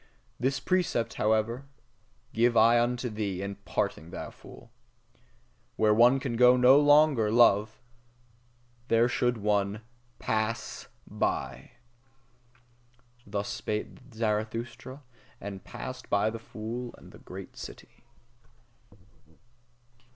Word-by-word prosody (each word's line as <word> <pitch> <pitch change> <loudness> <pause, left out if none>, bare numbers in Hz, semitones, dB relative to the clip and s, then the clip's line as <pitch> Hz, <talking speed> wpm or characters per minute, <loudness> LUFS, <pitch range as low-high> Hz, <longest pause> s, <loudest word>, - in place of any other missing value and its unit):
This 135 +2 0
precept, 180 -11 0
however, 110 +5 0 0.7
give 120 +1 +2
I 115 +2 +6
unto 125 +1 -1
thee, 105 -4 -3
in 100 0 -5
parting, 80 +3 -2
thou - - -7
fool: - - -15 1.0
Where 110 -1 +3
one 120 +4 +5
can 130 -3 -3
no 125 +2 +6
longer 145 -6 +4
love, 110 -2 +4 1.1
there 115 0 +4
should 120 0 0
one 105 0 0 0.3
PASS 110 +1 -3 0.2
BY! - - -3 1.5
Thus 100 0 -3
spake 105 0 -3 0.2
Zarathustra, 115 +4 -3 0.4
and 100 -1 -7
passed 130 -1 -8
by 100 +2 +2
the 115 - -6
fool 115 +2 -7
and - - -15
the - - -14
great - - -10
city. - - -11
115 Hz, 100 wpm, -28 LUFS, 105-125 Hz, 1.5 s, I